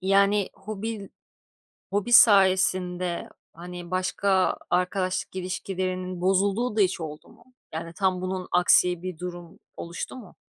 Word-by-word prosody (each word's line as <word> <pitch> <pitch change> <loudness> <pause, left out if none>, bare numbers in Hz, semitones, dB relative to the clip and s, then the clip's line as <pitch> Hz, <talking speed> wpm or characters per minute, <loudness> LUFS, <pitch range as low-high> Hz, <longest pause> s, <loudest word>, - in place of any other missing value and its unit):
Yani 200 +1 +3
hobi, 210 0 -6 0.8
hobi 205 +4 -2
sayesinde, 185 -4 +4 0.2
hani, 175 +1 -9
başka 185 +1 +1
arkadaşlık 185 +1 -1
ilişkilerinin 185 -1 -4
bozulduğu 200 +5 +1
da - - +5
hiç 190 -2 +1
oldu 150 -1 -8
mu? - - -20 0.3
Yani 165 +1 -5
tam 185 +1 0
bunun 185 0 -4
aksi 180 0 +4
bir 185 -2 -6
durum 175 -1 -8 0.2
oluştu 170 0 -6
mu? 235 -8 -12
185 Hz, 120 wpm, -25 LUFS, 180-195 Hz, 0.8 s, da